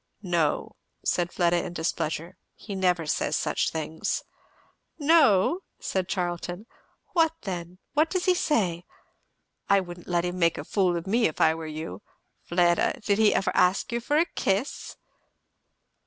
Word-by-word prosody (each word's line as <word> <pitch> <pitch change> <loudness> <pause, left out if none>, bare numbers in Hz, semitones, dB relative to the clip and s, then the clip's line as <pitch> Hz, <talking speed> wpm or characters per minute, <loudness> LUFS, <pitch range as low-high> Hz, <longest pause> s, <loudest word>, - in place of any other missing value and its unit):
"No," 170 -5 0 0.3
said 175 -1 +1
Fleda 175 -1 +2
in - - -6
displeasure, 165 0 -2 0.2
"he 205 - -8
never 180 -3 +1
says 150 - 0
such - - 0
things." 160 0 -3 0.7
"No?" 300 - +4 0.2
said 190 -1 -2
Charlton. 175 +1 -3 0.5
"What 325 -2 +3
then? 180 -2 -5 0.2
What 310 +2 +3
does 370 -2 -1
he 370 - +5
say? 190 - 0 0.9
I 200 - +6
wouldn't 175 -2 -8
let 175 -1 +1
him 180 +1 -3
make 170 -1 +3
a - - -4
fool 185 -4 +1
of 170 - -5
me 225 +4 +3
if 155 - -7
I 160 - +5
were 160 -1 -6
you. 155 - -6 0.4
Fleda! 175 0 +2
did 200 0 +2
he 215 -1 +5
ever - - +1
ask 180 +5 +2
you 235 - 0
for 290 +5 +1
a 330 - +4
kiss?" 205 - -2
180 Hz, 155 wpm, -26 LUFS, 170-210 Hz, 0.9 s, I